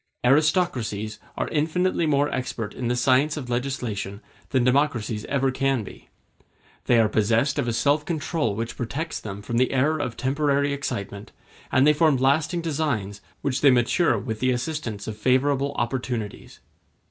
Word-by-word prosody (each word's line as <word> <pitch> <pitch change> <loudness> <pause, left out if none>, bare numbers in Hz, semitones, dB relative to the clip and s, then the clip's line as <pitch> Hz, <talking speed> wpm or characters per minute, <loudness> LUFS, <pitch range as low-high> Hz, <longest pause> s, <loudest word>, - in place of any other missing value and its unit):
Aristocracies 125 - +1 0.2
are - - -1
infinitely 165 +3 +1
more 145 -1 +2
expert 115 -4 -3
in 125 - -4
the 120 - +1
science 135 +5 +2
of 125 -4 -5
legislation 120 -6 -3 0.3
than 130 -3 +2
democracies 120 -5 +1
ever 135 -1 +1
can 135 -2 0
be. - - -12 0.8
They 120 - +4
are 110 - +4
possessed 115 +7 +1
of 130 - 0
a 120 - 0
self 145 +6 +2
control 155 - -1
which 115 +2 -4
protects 140 +7 -3
them 100 -1 -7
from 115 +2 -2
the 130 +1 +2
errors 145 +4 +1
of 115 - -4
temporary 140 +1 +1
excitement, 105 -7 -5 0.4
and 130 +1 +4
they 150 - +6
form 155 -2 +3
lasting 155 +6 +1
designs 140 -11 -2 0.2
which 140 -1 -1
they 145 - +7
mature 125 +3 +3
with 110 +1 -4
the 130 - +1
assistance 125 -5 -3
of 110 -1 -5
favorable 135 +4 +2
opportunities. 120 -4 -4
130 Hz, 160 wpm, -24 LUFS, 115-145 Hz, 0.8 s, they